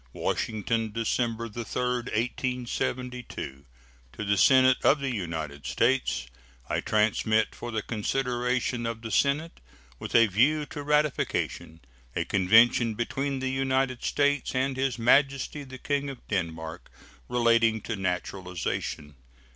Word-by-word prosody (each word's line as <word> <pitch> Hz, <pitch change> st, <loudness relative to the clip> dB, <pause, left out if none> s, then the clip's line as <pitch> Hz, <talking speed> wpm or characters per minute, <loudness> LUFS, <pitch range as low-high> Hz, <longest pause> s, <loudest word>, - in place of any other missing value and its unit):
WASHINGTON, 110 Hz, 0 st, -1 dB
December 115 Hz, 0 st, -1 dB
3, 115 Hz, +2 st, -6 dB
1872. 125 Hz, -, -3 dB, 0.5 s
To -, -, -5 dB
the 100 Hz, 0 st, +2 dB
Senate 130 Hz, +3 st, +6 dB
of 145 Hz, -, +5 dB
the 135 Hz, -2 st, -2 dB
United 80 Hz, -, -4 dB
States: 115 Hz, -, +1 dB, 0.4 s
I -, -, 0 dB
transmit, 110 Hz, 0 st, +1 dB
for 120 Hz, -, -7 dB
the 110 Hz, -2 st, -2 dB
consideration 125 Hz, +1 st, -1 dB
of 115 Hz, 0 st, -5 dB
the 115 Hz, -, -5 dB
Senate 145 Hz, +9 st, +1 dB, 0.4 s
with -, -, -5 dB
a 115 Hz, -1 st, +8 dB
view 135 Hz, +10 st, +2 dB
to 145 Hz, -, -7 dB
ratification, 150 Hz, -, -1 dB, 0.3 s
a -, -, 0 dB
convention 110 Hz, +4 st, +4 dB
between 135 Hz, +4 st, -2 dB
the 130 Hz, 0 st, -1 dB
United 130 Hz, -1 st, 0 dB
States 145 Hz, -2 st, +1 dB
and 130 Hz, +1 st, 0 dB
His 130 Hz, -2 st, -1 dB
Majesty 135 Hz, +4 st, +2 dB
the 130 Hz, -1 st, -10 dB
King 140 Hz, +1 st, -1 dB
of 135 Hz, -3 st, -10 dB
Denmark, 80 Hz, -4 st, -4 dB, 0.4 s
relating 115 Hz, -2 st, +3 dB
to 115 Hz, -, -4 dB
naturalization. 90 Hz, -5 st, -3 dB
120 Hz, 125 wpm, -27 LUFS, 105-130 Hz, 0.5 s, a